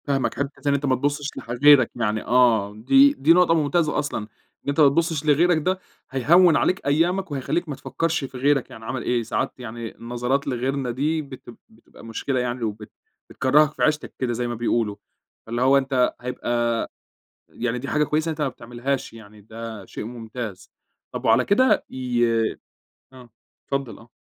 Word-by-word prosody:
فاهمَك 135 -2 0
حتّة 140 +1 -3
إن - - +3
أنت 140 +1 -1
ما 130 -2 +2
تبُصّش 145 +2 -2
لح - - -9
غيرك، 135 0 +6
يعني 110 -2 -1
آه 115 -5 +3
دي 270 - +5
دي 155 - +4
نقطة 175 -1 +4
ممتازة 155 0 +1
أصلًا، 145 -4 -2 0.5
إن - - -2
أنت 140 - -1
ما 150 - +8
تبُصّش 160 0 0
لغيرَك 160 +3 +4
ده 185 +5 -1 0.3
هيهوّن 160 +6 +5
عليك 180 +1 +1
أيامَك 170 +5 +1
وهيخلّيك 145 +5 -2
ما 145 - -3
تفكّرش 165 +2 -2
في 130 -1 -7
غيرك 135 0 +1
يعني 110 - -11
عمل 130 +2 -4
إيه، 120 -1 0
ساعات 135 - -2
يعني 115 -1 -7
النظرات 125 +4 -2
لغيرنا 130 0 -1
دي 150 +6 -1
بت 135 -4 -11 0.2
بتبقى 110 +1 -18
مشكلة 125 +4 -2
يعني 125 0 -3
وبت 105 -1 -5 0.4
بتكرّهك 140 +3 +3
في - - -3
عيشتَك 155 0 0
كده 125 -2 -1
زي 120 +1 -2
ما 120 - -3
بيقولوا، 115 -2 0 0.5
فاللي 120 +2 -3
هو 135 +2 +5
أنت 130 -2 +1
هيبقى 120 -2 -1 0.6
يعني 125 0 -3
دي 135 +3 -6
حاجة 150 0 +2
كويسة 155 +2 -1
إن - - 0
أنت 155 - -8
ما 145 - +1
بتعملهاش 125 +3 -4
يعني، 110 -2 -14
ده 110 0 -8
شيء - - -7
ممتاز، 115 -4 -7 0.4
طب - - -6
وعلى - - +4
كده 255 +6 +3
ي 125 -2 0 0.9
آه، 125 -2 -14 0.4
اتفضّل 140 -3 -3
آه. 110 - -17
130 Hz, 180 wpm, -23 LUFS, 120-150 Hz, 0.9 s, ما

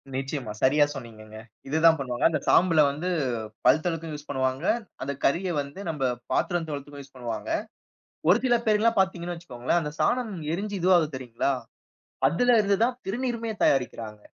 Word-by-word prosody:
நிச்சயமா. 135 -3 -3
சரியா, 145 +3 +5
சொன்னீங்கங்க. 110 -4 -10 0.3
இது 155 +3 0
தான் 160 -1 +7
பண்ணுவாங்க. 125 -3 -2
அந்த 155 -3 -1
சாம்பல 165 -3 +5
வந்து 155 +6 -4 0.6
பல் 150 +5 +5
தொளக்கவும் 165 -2 -2
யூஸ் 145 0 -10
பண்ணுவாங்க. 130 +3 -1 0.4
அந்த 140 +1 -3
கரிய 175 +5 +1
வந்து 140 +7 -9
நம்ப 150 -4 -3 0.3
பாத்திரம் 175 -3 0
தொளத்துக்கும் 145 0 -6
யூஸ் 140 -1 -21
பண்ணுவாங்க. 120 -3 -5 0.8
ஒரு 205 +6 +6
சில 240 -1 +4
பேர்ல்லாம் 215 +1 +3
பாத்தீங்கன்னு 175 -2 0
வச்சுக் 170 -6 -13
கோங்களேன், 130 +8 +1
அந்த 150 -1 -4
சாணம் 240 -4 +1 0.2
எரிஞ்சு 200 +2 -3
இதுவாகுது 170 -6 +3
தெரியும்ங்களா? 130 +1 -1 0.8
அதுலேருந்து 205 - +3
தான் 245 0 0
திருநீருமே 230 +1 -2
தயாரிக்கிறாங்க. 115 -5 0
155 Hz, 150 wpm, -26 LUFS, 135-190 Hz, 0.8 s, தான்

